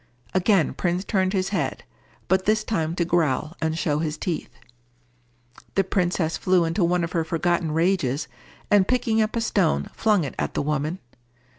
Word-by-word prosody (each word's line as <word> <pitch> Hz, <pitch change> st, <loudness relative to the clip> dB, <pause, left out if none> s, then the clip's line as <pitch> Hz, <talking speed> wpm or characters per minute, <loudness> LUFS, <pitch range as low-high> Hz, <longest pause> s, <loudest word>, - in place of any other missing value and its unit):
Again 185 Hz, -2 st, +3 dB
Prince 180 Hz, +1 st, -1 dB
turned 190 Hz, -3 st, +1 dB
his 190 Hz, -1 st, 0 dB
head, 200 Hz, -, -2 dB, 0.4 s
but 190 Hz, 0 st, +2 dB
this 215 Hz, +1 st, +2 dB
time 165 Hz, -6 st, -1 dB
to 175 Hz, -, 0 dB
growl 165 Hz, -2 st, 0 dB
and 160 Hz, 0 st, 0 dB
show 150 Hz, -3 st, 0 dB
his 155 Hz, -1 st, -2 dB
teeth. 170 Hz, -1 st, -3 dB, 1.3 s
The 195 Hz, -, +3 dB
princess 175 Hz, -3 st, 0 dB
flew 180 Hz, -2 st, +2 dB
into 165 Hz, +3 st, 0 dB
one 175 Hz, 0 st, +2 dB
of 165 Hz, -, -3 dB
her 165 Hz, -, 0 dB
forgotten 165 Hz, 0 st, 0 dB
rages, 155 Hz, -5 st, +1 dB, 0.4 s
and 200 Hz, -2 st, +5 dB
picking 230 Hz, -3 st, +2 dB
up 215 Hz, +1 st, -1 dB
a 230 Hz, -, 0 dB
stone, 195 Hz, -7 st, +1 dB
flung 210 Hz, -5 st, +2 dB
it 140 Hz, -, -4 dB
at -, -, -2 dB
the -, -, 0 dB
woman. 150 Hz, +3 st, -1 dB
175 Hz, 170 wpm, -24 LUFS, 160-195 Hz, 1.3 s, and